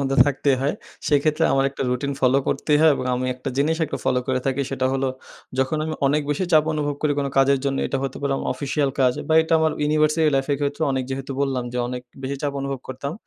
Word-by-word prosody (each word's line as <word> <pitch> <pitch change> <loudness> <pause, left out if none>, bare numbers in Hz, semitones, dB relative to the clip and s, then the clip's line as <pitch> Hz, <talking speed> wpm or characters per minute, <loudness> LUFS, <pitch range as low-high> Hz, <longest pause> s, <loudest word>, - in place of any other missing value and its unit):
মধ্যে 135 0 0
থাকতেই 140 -1 +1
হয়। 140 +2 +1 0.3
সেক্ষেত্রে 150 +1 +2
আমার 135 0 +3
একটা 140 - -5
রুটিন 140 +3 -1
ফলো 130 +1 +4
করতেই 145 +1 +1
হয় 160 0 +6
এবং 130 - -4
আমি 125 +1 -2
একটা 125 - -6
জিনিস 155 +3 +2
একটু 150 - -4
ফলো 125 -1 +2
করে 130 -1 0
থাকি, 135 +1 0
সেটা 130 -1 0
হল, 135 0 0 0.5
যখন 130 +4 +1
আমি 155 0 -3
অনেক 150 +2 +2
বেশি 145 +6 0
চাপ 155 -1 +6
অনুভব 145 -1 -1
করি 150 -1 +2
কোনো 140 -1 -1
কাজের 135 0 +4
জন্য, 135 -1 0
এটা 135 - -2
হতে 135 -1 -3
পারে 140 -1 0
আমার - - -3
অফিসিয়াল 140 +1 -1
কাজ 130 -1 +4 0.2
বা 160 - +3
এটা 160 - -4
আমার 160 -1 +2
ইউনিভার্সিটি 155 +1 +3
লাইফের 135 +1 0
ক্ষেত্রে 145 +2 -2
অনেক 130 -1 0
যেহেতু 135 +1 -4
বললাম 135 -3 0
যে, 125 - -2
অনেক 125 0 -5 0.2
বেশি 135 +1 -3
চাপ 145 -1 -1
অনুভব 135 0 -3
করতাম। 135 +2 -4
140 Hz, 230 wpm, -23 LUFS, 135-150 Hz, 0.5 s, হয়